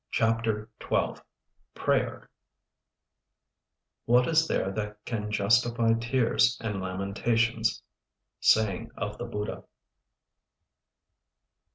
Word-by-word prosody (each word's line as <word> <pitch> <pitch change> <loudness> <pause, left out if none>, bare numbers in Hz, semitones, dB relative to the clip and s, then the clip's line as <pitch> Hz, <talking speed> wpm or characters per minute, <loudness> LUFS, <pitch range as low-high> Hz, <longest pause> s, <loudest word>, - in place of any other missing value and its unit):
CHAPTER 115 -2 0
XII - - -1 0.5
PRAYER - - 0 1.8
'What 125 +2 +4
is 160 0 +3
there 95 - 0
that 105 +1 -4
can 105 -3 -3
justify 115 +2 +3
tears 120 +1 +2
and 105 -4 -3
lamentations?' 110 +5 0 0.6
_Saying 105 -4 +3
of - - -4
the - - -3
Buddha. 105 0 -5
115 Hz, 80 wpm, -28 LUFS, 105-115 Hz, 1.8 s, What